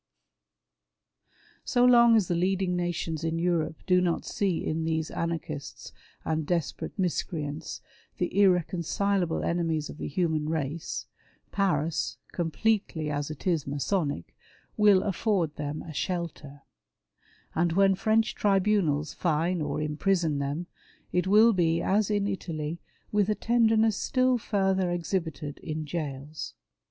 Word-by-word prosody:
So 245 0 +3
long 235 -2 +7
as 210 -5 +3
the - - 0
leadmg 185 +2 +1
nations 175 -2 -2
in 165 0 -1
Europe 165 -2 -1
do 180 -1 +4
not 175 -2 0
see 190 -5 -1
in 160 +1 -1
these 160 -1 -1
anarchists 160 -3 -4 0.3
and 160 0 0
desperate 170 +1 -2
miscreants 160 -4 -3 0.4
the 180 0 -2
irreconcilable 180 0 +1
enemies 165 -3 -1
of - - -12
the - - -3
human 155 -1 0
race, 160 0 -3 0.5
Paris, 165 -6 0
completely 170 -2 0
as 145 0 -2
it 155 - -8
is 165 -7 +1
Masonic, 145 - -2 0.4
will 205 -3 +5
afford 190 -5 0
them 150 0 -4
a 160 - -8
shelter; 155 -5 -4 0.9
and 170 0 +1
when 195 +1 +5
French 220 +3 +2
tribunals 195 -7 +1
fine 170 +1 0
or 150 - -2
imprison 155 0 0
them, 140 +5 -2 0.5
it 180 0 +1
will 215 +4 +6
be 165 -3 +2
as 200 +4 +1
in 205 -1 +1
Italy 165 -4 -4 0.3
with 210 -1 +2
a 210 - +2
tenderness 225 -2 +3
still 255 -1 +2
further 190 -4 +1
exhibited 165 -5 -3
in 155 -1 -4
gaols. 150 -1 -5
170 Hz, 125 wpm, -28 LUFS, 155-195 Hz, 0.9 s, long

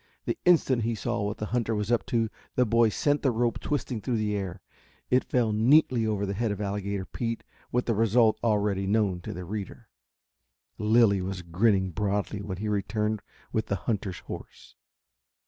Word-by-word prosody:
The - - 0
instant 140 -8 +4
he 115 +1 0
saw 105 - -2
what 105 +1 -2
the 105 - -3
hunter 115 -2 +1
was 105 +2 -2
up 120 - +1
to, 115 -4 +1 0.3
the 125 - +4
boy 115 0 +4
sent 145 +6 +1
the 135 - +3
rope 120 0 0
twisting 125 -6 -2
through 120 +1 -1
the 105 -1 0
air. 95 -2 -4 0.5
It 125 +1 +4
fell 120 -3 +1
neatly 120 0 +4
over 105 -2 0
the 100 - -2
head 115 +3 -1
of 100 - -4
Alligator 100 -1 -2
Pete 115 +2 -4 0.3
with 125 +1 +1
the 115 - +1
result 110 +1 +3
already 105 -3 +1
known 100 -4 +1
to - - -6
the 90 +1 -6
reader. 105 +3 -6 0.9
Lilly 105 -2 +4
was 90 -1 -4
grinning 95 +2 +2
broadly 105 +2 -1
when 95 -2 -5
he 105 +3 -3
returned 105 +1 -1 0.3
with 110 0 0
the 100 - 0
hunter's 100 -5 -1
horse. - - -10
105 Hz, 180 wpm, -27 LUFS, 100-115 Hz, 0.9 s, instant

